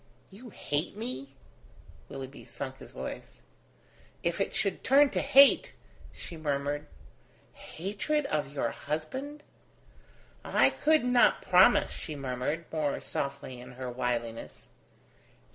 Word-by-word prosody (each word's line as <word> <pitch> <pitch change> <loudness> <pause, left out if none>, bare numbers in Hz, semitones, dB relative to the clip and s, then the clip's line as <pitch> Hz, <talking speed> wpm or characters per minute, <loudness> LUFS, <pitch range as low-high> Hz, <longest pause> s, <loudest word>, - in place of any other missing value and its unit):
"You 230 +6 -12
hate 150 -1 -3
me?" 140 - -6 0.7
Willoughby 135 0 -8
sunk 135 -1 -7
his - - -11
voice. - - -8 0.8
"If 170 +3 0
it - - -1
should 200 -3 0
turn 280 +1 +5
to - - 0
hate!" 275 +1 +6 0.4
she 170 - -9
murmured. 145 -1 -2 0.7
"Hatred 210 - -3
of 150 - -1
your 145 - -1
husband?" 260 - -5 1.0
"I - - +3
could 310 -3 +2
not 250 -1 +4
promise," - - +5
she 155 - -6
murmured, 135 +4 -3
more 155 -3 -1
softly 140 -2 -4
in 125 +1 -11
her 125 0 -5
wiliness. 120 -2 -4
150 Hz, 115 wpm, -29 LUFS, 135-225 Hz, 1.0 s, hate